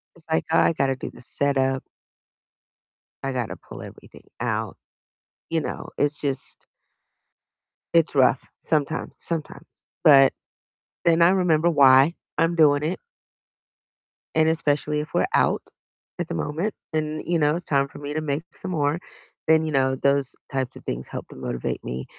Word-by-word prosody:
it's, 170 - -18
like, 160 - +1
I 165 - +4
got 140 -3 +1
to 135 - 0
do 130 - -6
the - - -14
setup 135 0 0 1.4
I 135 0 -2
got 125 -3 -1
to - - -6
pull - - -11
everything - - -12 0.2
out. - - -2 0.7
You 165 -1 +1
know, - - -5
it's 145 0 0
just 140 -2 -4 1.3
it's 165 -1 +4
rough 130 -2 +3
sometimes 155 0 -1
sometimes, 160 -2 -6 0.2
but 135 -4 +8 0.7
then 170 0 +4
I 170 - +7
remember 175 -3 +3
why 140 +1 +6 0.2
I'm 165 +2 +2
doing 150 -3 +4
it. 165 +4 -2 1.4
And 160 0 +4
especially 150 -2 0
if 150 - -6
we're - - +3
out - - +2 0.6
at - - -2
the - - -4
moment 160 - -2 0.2
and, 155 0 -1
you 170 -1 +1
know, 150 0 +3
it's 175 - -5
time 140 -1 +2
for - - -12
me 145 0 -5
to 155 - -1
make 150 0 -2
some 190 - -6
more, 150 -1 0 0.5
then, 160 0 +4
you 155 - -2
know, 130 -2 +2
those 140 0 +1 0.2
types 130 -3 -2
of - - -12
things - - -4
help - - -7
to - - -12
motivate 60 - -4
me. 65 +1 -5
150 Hz, 160 wpm, -24 LUFS, 135-160 Hz, 1.4 s, but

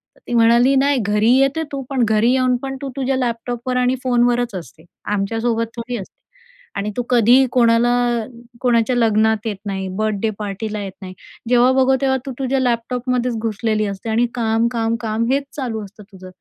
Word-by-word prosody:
तर - - -24
ती - - -4
म्हणाली, 235 +3 +4
"नाही 280 +1 +3
घरी 210 +2 +1
येते 275 +4 +2
तू, 275 -1 -4
पण 265 -3 +1
घरी 220 +2 +2
येऊन 255 -1 +2
पण 270 0 -4
तू 275 - -4
तुझ्या 270 -1 -1
लॅपटॉपवर 245 0 -2
आणि 250 +1 +2
फोनवरच 245 -2 +1
असते, 165 -3 -9 0.3
आमच्यासोबत 225 +3 -1
थोडी 235 +1 -5
असते." 195 - -11 0.6
आणि 205 +1 -3
"तू 245 - 0
कधीही 245 +2 +5
कोणाला 235 -1 +3 0.7
कोणाच्या 245 0 +2
लग्नात 220 -1 +2
येत 210 -3 -3
नाही, 190 -1 -3
बर्थडे 215 0 0
पार्टीला 210 +1 -4
येत 195 -1 -7
नाही, 185 -1 -8 0.4
जेव्हा 245 +1 +5
बघावं 265 0 +3
तेव्हा, 265 -1 +2
तू 270 - -4
तुझ्या 270 0 0
लॅपटॉपमध्येच 250 0 -1
घुसलेली 215 -1 -1
असते 200 +3 -6
आणि 230 +2 +2
काम-काम-काम 230 -1 0
हेच 280 +1 +1
चालू 235 -6 -3
असतं 205 +2 -14
तुझं, 185 -1 -12
235 Hz, 170 wpm, -19 LUFS, 215-250 Hz, 0.7 s, कधीही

